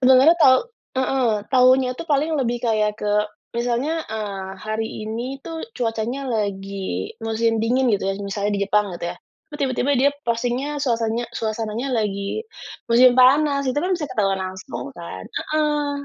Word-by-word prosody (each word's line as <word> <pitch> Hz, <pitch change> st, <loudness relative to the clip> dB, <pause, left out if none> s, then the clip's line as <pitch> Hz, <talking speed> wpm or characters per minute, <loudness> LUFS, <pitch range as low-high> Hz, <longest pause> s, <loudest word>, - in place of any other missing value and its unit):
Sebenarnya 265 Hz, +6 st, +7 dB
tau 260 Hz, -3 st, +7 dB, 0.4 s
heeh. 260 Hz, -2 st, +2 dB, 0.2 s
Taunya 255 Hz, 0 st, +5 dB
itu -, -, -6 dB
paling 305 Hz, +1 st, +1 dB
lebih 240 Hz, -1 st, 0 dB
kayak 215 Hz, -2 st, +1 dB
ke 205 Hz, 0 st, 0 dB, 0.4 s
misalnya, 245 Hz, +7 st, 0 dB
eee, 200 Hz, -3 st, -4 dB
hari 215 Hz, +2 st, -3 dB, 0.2 s
ini 240 Hz, +5 st, -4 dB
itu 330 Hz, +4 st, -8 dB, 0.3 s
cuacanya 235 Hz, +3 st, -2 dB
lagi 195 Hz, -, -3 dB
musim 225 Hz, 0 st, +1 dB
dingin 255 Hz, +3 st, +2 dB
gitu 205 Hz, -, +1 dB
ya, -, -, -2 dB
misalnya 200 Hz, +1 st, -2 dB
di -, -, -3 dB
Jepang 210 Hz, 0 st, +2 dB
gitu 170 Hz, -, -4 dB
ya. -, -, -19 dB, 0.3 s
Itu -, -, -10 dB
tiba-tiba 260 Hz, 0 st, 0 dB
dia 280 Hz, +3 st, +4 dB, 0.2 s
postingnya 250 Hz, +5 st, -1 dB
suasanya 235 Hz, -2 st, 0 dB
suasananya 225 Hz, +3 st, -3 dB
lagi 205 Hz, -, -1 dB, 0.5 s
musim 245 Hz, +1 st, +7 dB
panas, 280 Hz, +2 st, +4 dB
itu 255 Hz, -, -1 dB
kan 365 Hz, +5 st, +1 dB
bisa 320 Hz, -4 st, -3 dB
ketahuan 195 Hz, -6 st, 0 dB
langsung, 185 Hz, -10 st, -6 dB
kan? 90 Hz, +2 st, -7 dB, 0.3 s
Heeh. 300 Hz, -1 st, +1 dB
235 Hz, 155 wpm, -22 LUFS, 210-265 Hz, 0.5 s, Sebenarnya